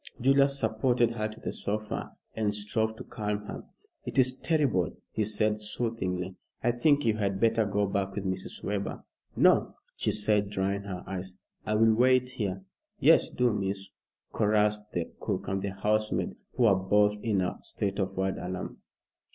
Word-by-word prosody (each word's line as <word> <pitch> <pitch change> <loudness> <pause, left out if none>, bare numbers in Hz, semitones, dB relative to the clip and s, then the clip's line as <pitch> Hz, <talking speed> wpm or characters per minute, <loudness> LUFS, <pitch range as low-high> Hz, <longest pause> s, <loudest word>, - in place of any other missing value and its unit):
Julius 140 +2 +4
supported 120 0 +2
her 110 -2 -2
to 110 0 -11
the - - -4
sofa 105 +1 -3 0.2
and 105 -2 0
strove 110 +2 0
to - - -8
calm 105 -2 -4
her. - - -7 0.4
"It - - -6
is 130 -1 +5
terrible," 135 - +1
he 110 - 0
said 105 0 +1
soothingly. 95 -5 -2 0.3
"I 120 - +3
think 145 +4 +2
you 110 -1 +2
had 100 -2 -1
better 115 0 +3
go 100 0 +1
back 100 0 -2
with 100 - -3
Mrs. 95 0 -3
Webber." 100 -1 -3 0.3
"No!" - - +4 0.2
she - - 0
said, 105 -1 +1
drying 100 0 -1
her 95 -3 -5
eyes. 95 -1 -5 0.3
"I 110 - +1
will 110 +1 +5
wait 125 +2 +3
here." 95 -5 -3 0.4
"Yes, - - +5
do, 125 -2 +1
miss," 100 -1 -2 0.4
chorussed 105 -1 +2
the 85 -2 -3
cook - - -3
and 95 +1 -1
the 100 - -2
housemaid, 105 +2 0 0.2
who 125 - +2
were 110 -4 +6
both 105 +2 +3
in 105 -5 +1
a 90 - -2
state 100 0 -3
of 95 -1 -2
wild 95 0 -1
alarm. 90 0 -5
105 Hz, 170 wpm, -29 LUFS, 95-115 Hz, 0.4 s, were